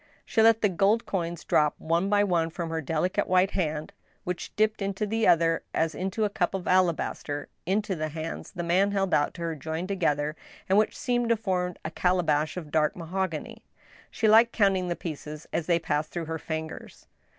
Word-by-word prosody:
She 225 - +2
let 225 0 +5
the - - +6
gold 200 +5 +2
coins 170 -4 -3
drop 150 -1 +2
one 170 +4 0
by 205 0 +4
one 170 -4 +1
from 165 0 -5
her 165 0 -1
delicate 165 +7 0
white 185 +1 +3
hand, 155 0 -2 0.3
which 180 -3 -4
dipped 215 0 +1
into 195 +1 -1
the 225 +1 +1
other 165 -1 +4
as 160 0 +1
into 190 +4 -2
a - - 0
cup 195 -2 0
of 190 - -5
alabaster, 170 -5 0 0.2
into 200 +1 0
the 155 -1 -3
hands 160 +1 -6
the 175 -3 -5
Inan 190 +4 +2
held 195 -2 0
out 145 - +2
to 170 - -8
her 165 -1 -1
joined 160 +5 -4
together, 150 -6 0 0.3
and 195 +2 +4
which 215 - 0
seemed 245 -3 0
to 230 - +3
form 180 -4 -1
a 155 - -3
calabash 165 -3 +1
of 155 -4 -7
dark 150 -1 +2
mahogany. 175 -1 -4 0.5
She 220 - 0
liked 225 +2 +6
counting 195 -4 +2
the 175 - -1
pieces 150 -2 -7
as 165 - -1
they 170 -2 +4
passed 155 -2 -1
through 170 -2 -4
her 160 0 -4
fingers. 160 +1 -6
180 Hz, 195 wpm, -27 LUFS, 160-200 Hz, 0.5 s, the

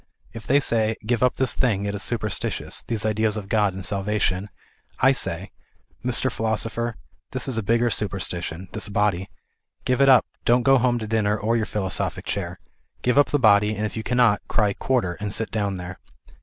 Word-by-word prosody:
If 115 -1 -9
they 140 +2 +5
say 110 -4 +1
" - - -19
Give 120 0 0
up 125 -1 +3
this 130 -1 +2
thing, 105 -6 0
it 100 - -2
is 100 - -4
superstitious, 110 -4 -3
these 110 -2 -3
ideas 110 0 +1
of 100 -2 -6
God 105 -3 +1
and 95 - -4
salvation 100 -2 0
are - - -14
superstition," - - -34
I - - +5
say - - -3 0.5
ŌĆó" 125 - -1
Mr. 130 +1 +3
Philosoper, 115 +1 -1 0.4
this - - -2
is 130 - -2
a 115 - 0
bigger 115 +3 +2
superstition, 95 -3 -3
this 110 -1 -3
body. 100 -2 0 0.6
Oive 130 +1 +1
it 135 - +6
up, 130 - +6 0.2
don't 120 +1 +3
go 135 +1 +5
home 120 0 +2
to 110 - -4
dinner 105 -1 +1
or 110 +3 0
your 110 -1 0
philosophic 95 -4 -2
chair. - - -3 0.4
Give 125 +3 +3
up 145 - +5
the 145 - +1
body, 105 -3 +4
and 105 +1 -2
if 105 - -5
you 110 - -2
cannot, 120 -3 +2
cry 105 -3 +1
quarter, 120 -9 0
and 105 -1 -3
sit 110 +2 -2
down 100 -3 -1
there." 90 0 -7
110 Hz, 210 wpm, -23 LUFS, 100-120 Hz, 0.6 s, it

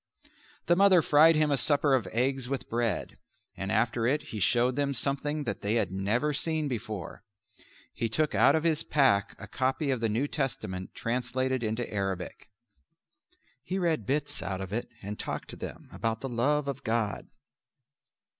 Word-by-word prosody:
The 175 - +4
mother 190 -3 +5
fried 160 +2 +6
him 155 -1 +2
a 140 - +3
supper 145 +1 +3
of 120 -7 +2
eggs 125 +5 0
with 135 -1 -3
bread, 115 -1 -1 0.4
and 95 0 -4
after 115 0 +1
it 145 +3 +1
he 110 - -5
showed 120 +6 +3
them 140 -1 0
something 145 +4 0
that 100 -7 -4
they 105 +3 0
had 105 -6 +1
never 110 +10 0
seen 155 0 0
before. 110 -9 -5 0.7
He 115 - -2
took 150 +8 +1
out - - +5
of 160 - 0
his 160 -3 +2
pack 120 -9 +2
a - - -9
copy 135 +3 0
of 130 - 0
the 115 -1 0
New 120 +7 0
Testament 110 -11 -4
translated 130 +2 -1
into 110 +1 -2
Arabic. 95 -2 -4 1.1
He 185 - -3
read 170 -4 0
bits 145 +2 -1
out 95 -1 -3
of 95 0 -6
it 120 - -3
and 105 +1 -6
talked - - -4
to - - -8
them - - -8
about 115 0 -2
the 135 - -4
Love 140 +5 +1
of 140 0 -4
God. 110 -2 -1
125 Hz, 175 wpm, -29 LUFS, 110-145 Hz, 1.1 s, fried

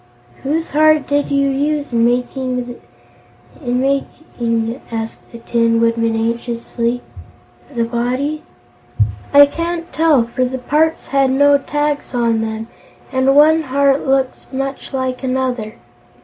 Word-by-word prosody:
"Whose 320 +4 -2
heart 310 -1 +4
did 285 0 0
you 280 0 +2
use 290 0 -1
in 230 0 +3
making 250 +1 -1
the 245 0 -9 0.9
body?" 245 -2 -1
asked 225 0 -4
the 235 - -9
Tin 230 0 +1
Woodman 230 0 +1
anxiously. 235 +1 -2 0.7
"I 250 +5 -1 1.0
can't 335 +3 -4
tell, 310 -6 +4
for 235 +2 -2
the 255 +1 -2
parts 305 +5 0
had 275 -1 +2
no 285 +2 +4
tags 295 -1 -2
on 230 -2 +1
them 220 0 -4 0.4
and 265 +1 +2
one 310 +2 +6
heart 275 -1 +2
looks 265 -1 0
much 270 +1 -4
like 260 -2 -2
another. 255 -4 -2
260 Hz, 120 wpm, -17 LUFS, 235-285 Hz, 1.0 s, one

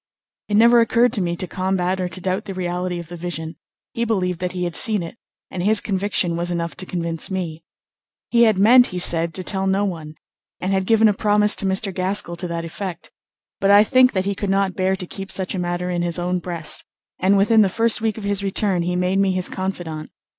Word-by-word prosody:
It 210 - +1
never 235 +2 +6
occurred 235 +1 +2
to 210 - -1
me 170 -1 -1
to 185 - -4
combat 185 0 -1
or 180 - -2
to 175 - -6
doubt 185 +3 -2
the 195 -3 -6
reality 180 0 -3
of 170 -1 -7
the 175 - -7
vision; 165 -2 -6 0.4
he 230 - -1
believed 185 -6 -1
that 180 -1 -3
he 180 -1 -3
had 175 -2 -3
seen 215 -6 +2
it, 165 - -8 0.4
and 180 - -4
his 210 +3 +3
conviction 190 -3 -1
was 175 +1 -2
enough 170 -1 -3
to 185 -1 -6
convince 170 -2 -3
me. 170 -4 -4 0.7
He 235 - +4
had 215 -3 +3
meant, 245 +5 +6
he 180 - -6
said, 170 -1 +2
to 185 - -2
tell 190 0 +1
no 195 +1 +1
one, 160 -5 -6 0.4
and 185 - -2
had 190 -1 0
given 225 -1 +5
a 210 - +3
promise 210 0 +2
to 195 - 0
Mr. 190 +1 0
Gaskell 185 -1 0
to 180 - -3
that 170 -1 -4
effect; 175 +1 -7 0.5
but 195 - +1
I 205 +1 +7
think 255 +3 +4
that 190 -2 -1
he 200 - 0
could 200 0 -4
not 195 -1 +1
bear 190 +1 0
to 180 - -6
keep 195 +2 -8
such 190 +1 -3
a 190 - -3
matter 175 0 -2
in 175 -1 -1
his 175 0 -1
own 180 +1 -1
breast, 170 -3 -2 0.4
and 195 +2 +3
within 215 +3 +4
the 200 - +3
first 225 +3 +1
week 220 -1 -1
of 220 - -7
his 200 -1 -1
return 195 -2 0
he 180 +1 -2
made 180 +2 0
me 195 -1 +2
his 185 -1 +1
confidant. 175 -5 -5
185 Hz, 235 wpm, -21 LUFS, 175-200 Hz, 0.7 s, I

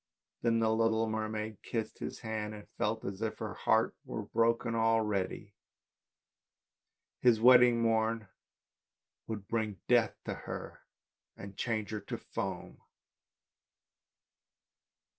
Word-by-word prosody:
Then 115 -1 +2
the 110 -1 +2
little 115 0 +2
mermaid 110 -1 -3
kissed 110 -2 -4
his - - -5
hand, 110 -2 -3
and 105 - -11
felt 110 +1 0
as 100 +1 -5
if 110 -1 -2
her - - -4
heart - - +2
were - - -5
broken 115 +1 +1
already. 110 -3 0 1.7
His 120 -3 +5
wedding 125 0 +7
morn 110 -1 +1 1.0
would 105 -3 -5
bring 110 -4 -2
death 120 -2 +4
to - - -2
her - - -7 0.6
and 100 0 -9
change 110 -3 -2
her 105 - -2
to 100 - -5
foam. - - -5
110 Hz, 115 wpm, -32 LUFS, 105-115 Hz, 1.7 s, wedding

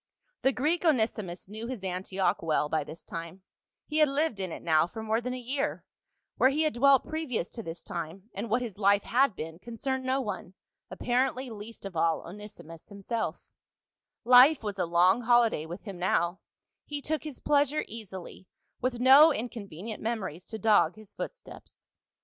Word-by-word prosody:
The 265 - +3
Greek, 305 +7 0
Onesimus, 220 - 0
knew 220 +3 -7
his 245 -6 -6
Antioch 185 +1 -1
well 155 -2 +1
by 155 -1 0
this 155 +2 -11
time; 170 +2 -7 0.4
he 305 +1 -1
had 305 -2 +5
lived 280 -5 0
in 185 -2 -3
it - - -7
now 160 0 +3
for 220 +4 -7
more 220 +1 0
than 250 +1 -3
a - - -5
year; 270 +4 -3 0.5
where 260 - +5
he 300 +3 +1
had 310 - +1
dwelt 270 +2 +5
previous 310 - -3
to 230 - -7
this 165 -4 -7
time 170 +4 -6
and 230 - -5
what 245 +4 +1
his 215 -5 -7
life 200 0 +4
had 255 -2 +2
been, 160 +1 -7
concerned 260 +4 -3
no 260 +1 +1
one, 200 -6 -5 0.3
apparently 255 0 -1
least 215 0 -9
of 195 -3 -7
all 165 0 +2
Onesimus 175 -4 -11
himself 205 +3 -4 0.8
Life 255 +4 +7
was 205 -2 -4
a 180 - +1
long 180 +6 +4
holiday 235 -9 +3
with 175 +4 -8
him 195 -5 -8
now, 175 0 +1 0.4
he 290 -1 -5
took 310 +2 -3
his 300 -4 -7
pleasure 290 0 +2
easily, 190 -4 -9 0.3
with 250 -1 -1
no 270 +5 +8
incon 230 -6 -4
venient 205 +8 -7
memories 210 -7 -4
to 220 - -6
dog 210 -5 +3
his 215 -2 -15
footsteps. - - -9
220 Hz, 180 wpm, -29 LUFS, 185-260 Hz, 0.8 s, no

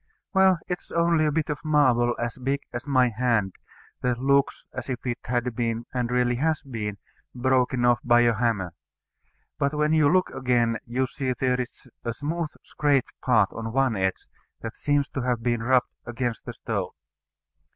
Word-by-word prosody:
Well, 190 -2 +5
it 180 - -2
is - - -23
only 170 -2 +3
a - - +1
bit 155 +1 0
of 145 - -5
marble 130 -6 +3
as 120 0 -3
big 135 +2 -2
as 120 +4 -5
my 130 -3 +4
hand, 115 -4 0 0.5
that 125 -1 0
looks 140 +2 +2
as 130 +1 -6
if 125 -1 -4
it 120 -1 -2
had 120 0 -1
been, 115 -1 -1
and 125 -2 -1
really 125 -1 +1
has 155 +4 0
been, 110 -7 -4 0.4
broken 125 0 +2
off 120 -2 +4
by 120 0 +5
a 120 -1 +4
hammer. 110 -6 0 0.9
But 140 +2 +1
when 150 +1 +2
you 155 -2 +5
look 185 0 +2
again, 120 -3 +1
you 125 +3 0
see 130 -1 -2
there 125 -1 +1
is 125 +1 -9 0.2
a 115 - -2
smooth 155 +4 -2
scraped 145 -3 +1
part 110 -6 +3
on 115 0 -5
one 135 -3 +2
edge, 95 -1 -1 0.4
that 115 0 -6
seems 145 -1 +1
to 135 - -3
have 120 -2 -1
been 120 -1 0
rubbed 125 +1 +2
against 120 -1 -3
a - - -4
stone. - - -3
125 Hz, 180 wpm, -25 LUFS, 120-140 Hz, 0.9 s, Well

